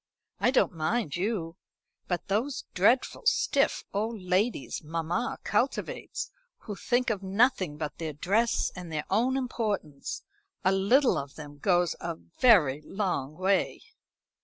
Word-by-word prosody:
I - - +3
don't 260 - +3
mind 160 - -1
you; 180 -3 -2 0.5
but 175 -1 -2
those 235 +8 -1
dreadful 245 - +2
stiff 450 - +2
old 220 +2 -1
ladies 185 - 0
mamma 165 +8 -2
cultivates, - - -1 0.3
who 210 - -6
think 245 +3 +1
of 205 -3 -2
nothing 190 - +2
but 150 0 -5
their 160 -2 -3
dress 210 +10 +1
and 180 -3 -7
their 155 -1 -2
own 245 +6 +2
importance 210 - -3 0.4
a 190 - +5
little 220 +8 +4
of 140 0 -7
them 145 -2 -10
goes 175 0 +2
a 170 -1 -3
very 170 - +3
long 160 -7 -2
way." 190 +1 +1
190 Hz, 135 wpm, -28 LUFS, 160-230 Hz, 0.5 s, a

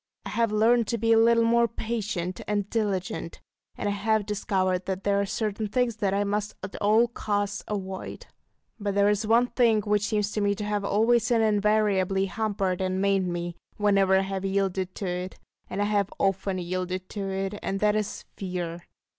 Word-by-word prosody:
I - - -4
have 230 -2 +1
learned 225 +2 +3
to 235 - -1
be 225 +1 +3
a 225 - +5
little 230 0 +5
more 235 +1 +4
patient 215 -6 -3
and 205 -1 0
diligent, 190 -6 -2 0.4
and - - -2
I - - +1
have 210 +1 +1
discovered 190 -3 -1
that 190 0 -3
there 200 0 +2
are 200 - -2
certain 215 +1 -2
things 235 +1 0
that 200 -3 0
I 200 +1 +1
must 205 +1 -2
at 190 - -6
all 220 +3 +4
costs 205 -3 -2
avoid. 190 -2 -5 0.5
But 200 -1 -2
there 200 0 +4
is 210 +1 0
one 230 +2 +5
thing 230 -4 +3
which 210 0 +1
seems 210 -1 0
to 215 - -2
me 205 0 +2
to 210 - -5
have 205 -1 -1
always 225 +3 +2
and 230 -2 +3
invariably 205 -3 +2
hampered 195 -3 -1
and 185 0 -1
maimed 195 -1 +2
me, 175 0 -4 0.2
whenever 195 -2 +4
I - - +3
have 195 0 -3
yielded 190 -1 -1
to 200 - -4
it, 180 +1 -4 0.3
and 205 - -1
I - - +1
have 205 -2 +1
often 195 0 0
yielded 185 +1 -3
to 200 -2 -4
it; 195 +1 -3
and 195 - -2
that 210 0 +3
is 215 +1 -3
Fear. 175 -3 -4
205 Hz, 195 wpm, -26 LUFS, 190-215 Hz, 0.5 s, a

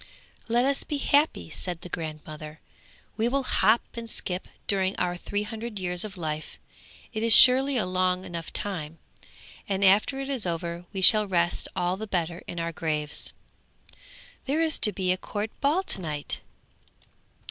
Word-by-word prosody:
'Let 240 +2 +2
us 275 0 +1
be 295 - -3
happy,' 280 - +1
said 175 -2 -4
the - - -9
grandmother; 155 -2 -7 0.6
'we 225 +1 +1
will 275 +2 0
hop 235 -2 +3
and 230 -1 -7
skip 180 -3 -4 0.2
during 190 -1 0
our 180 -1 -1
three 205 +3 -3
hundred 220 +1 -6
years 180 -2 0
of 205 -3 -7
life; 155 -2 -5 0.6
it 220 - -3
is 230 0 +7
surely 265 +1 +8
a 215 - +1
long 185 0 0
enough 170 -2 -7
time; 165 -6 -4 0.7
and 195 0 +1
after 210 +8 +3
it 270 - -4
is 260 -8 -2
over 170 +1 -4
we 195 -2 -4
shall 210 +2 +8
rest 175 -2 0
all 180 +1 -1
the 220 +2 -6
better 175 -3 -2
in 170 - -5
our 165 0 -2
graves. 155 -2 -3 1.1
There 300 +4 +1
is 315 -2 +2
to 210 - +3
be 185 -3 -1
a 185 - 0
court 210 +3 -5
ball 305 +7 +2
to 195 - -4
night.' 150 -3 -5
190 Hz, 170 wpm, -26 LUFS, 170-230 Hz, 1.1 s, surely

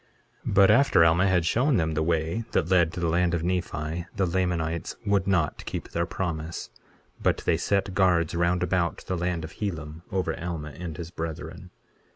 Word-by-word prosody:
23:37 - - -1
But 100 -1 +7
after 135 -11 +5
Alma 85 +4 +4
had 90 -3 +2
shown 125 - +2
them 80 -2 0
the 80 - 0
way 80 +6 0
that 85 - +1
led 85 -3 +4
to - - -5
the 85 - 0
land 85 +1 +2
of 85 - -2
Nephi 85 -2 -2
the 100 -2 +1
Lamanites 85 -2 -1
would 100 -2 +2
not 90 -6 +1
keep - - -5
their 85 0 -1
promise; 80 -3 -4 0.5
but - - +1
they - - +3
set 100 -1 0
guards 90 -4 +3
round 85 +1 +1
about 90 -2 -1
the 95 - -2
land 85 -1 -2
of 80 - -7
Helam, 80 -6 -4
over 95 -1 -1
Alma 85 -3 -4
and 80 +1 -7
his 85 0 -7
brethren. 85 +1 -6
85 Hz, 190 wpm, -26 LUFS, 80-95 Hz, 0.5 s, But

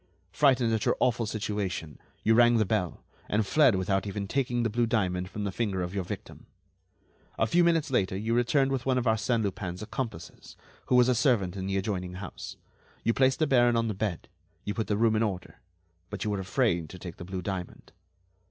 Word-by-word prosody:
Frightened 130 -5 +3
at 110 - 0
your - - +2
awful 120 -2 +1
situation, 100 -8 -3 0.2
you 110 - +4
rang 120 0 +5
the 110 - +3
bell, 95 -4 -2 0.3
and 105 +1 +1
fled 135 -1 +4
without 95 +2 0
even 100 0 -4
taking 120 -1 0
the 115 - +1
blue 120 +1 +1
diamond 90 -5 0
from 105 +1 -5
the 100 - -2
finger 95 -3 -1
of 90 +1 -5
your 100 -2 -1
victim. - - -8 0.9
A - - +2
few 175 +10 +3
minutes 165 -3 +2
later 95 -6 +1
you 110 +3 -1
returned 135 +3 +2
with 135 -3 -1
one 130 0 +1
of 125 - 0
Arsène 110 +1 +1
Lupin's 95 -1 -4
accomplices, 105 -7 -6 0.3
who 125 - +2
was 125 -1 +6
a 130 - +4
servant 115 -6 +2
in 95 -1 -4
the 95 0 0
adjoining 95 -2 -3
house, 95 0 -8 0.5
you 115 - +2
placed 130 +1 +3
the 160 - +2
baron 120 -4 +4
on 115 -1 +1
the - - -1
bed, 100 -4 -3 0.4
you 105 - -3
put 110 0 -2
the 105 - 0
room 110 0 +3
in 110 - +1
order, 95 -5 -3 0.5
but 100 -1 -5
you 105 - -1
were 100 - -1
afraid 95 - 0
to 90 - -9
take 90 -1 -9
the - - -8
blue 95 0 -5
diamond. 90 -1 -6
110 Hz, 210 wpm, -28 LUFS, 95-120 Hz, 0.9 s, was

